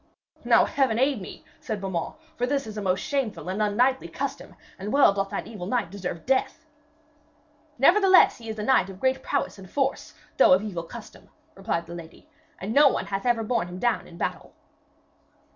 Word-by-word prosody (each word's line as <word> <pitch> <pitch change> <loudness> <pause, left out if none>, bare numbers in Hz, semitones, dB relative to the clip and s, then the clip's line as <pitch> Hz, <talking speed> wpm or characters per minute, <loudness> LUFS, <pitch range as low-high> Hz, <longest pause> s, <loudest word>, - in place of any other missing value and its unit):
'Now - - +5
Heaven 260 -6 +1
aid 265 -3 +1
me,' - - -10
said 215 -2 -4
Beaumains, 190 -4 -3 0.2
'for 245 -4 -1
this 275 0 -1
is 215 -1 -8
a 210 - -4
most 185 -1 0
shameful 275 -11 -3
and 195 +3 -2
unknightly 245 +6 +2
custom, - - -6 0.2
and 200 +3 -5
well 275 -7 +5
doth 195 0 -2
that - - -4
evil 205 -6 -7
knight 235 -6 -1
deserve 180 -4 -6
death.' 270 +5 0 1.1
'Nevertheless 375 - +5
he 225 -1 -9
is 220 - -5
a 210 - -3
knight 215 -6 +3
of 190 -1 -10
great 260 +2 +1
prowess - - -2
and 190 -1 -12
force, 275 +2 -2 0.2
though - - +7
of 185 +3 +3
evil 190 -6 -4
custom,' 220 +7 -12 0.2
replied 195 -4 -3
the 170 - -9
lady, 165 -1 -11 0.3
'and 200 +4 -4
no 290 +2 +7
one - - 0
hath 195 +4 -3
ever 235 -2 +2
borne 230 -4 -1
him 180 +1 -8
down 240 +3 0
in 170 - -13
battle.' - - -4
215 Hz, 195 wpm, -25 LUFS, 190-260 Hz, 1.1 s, though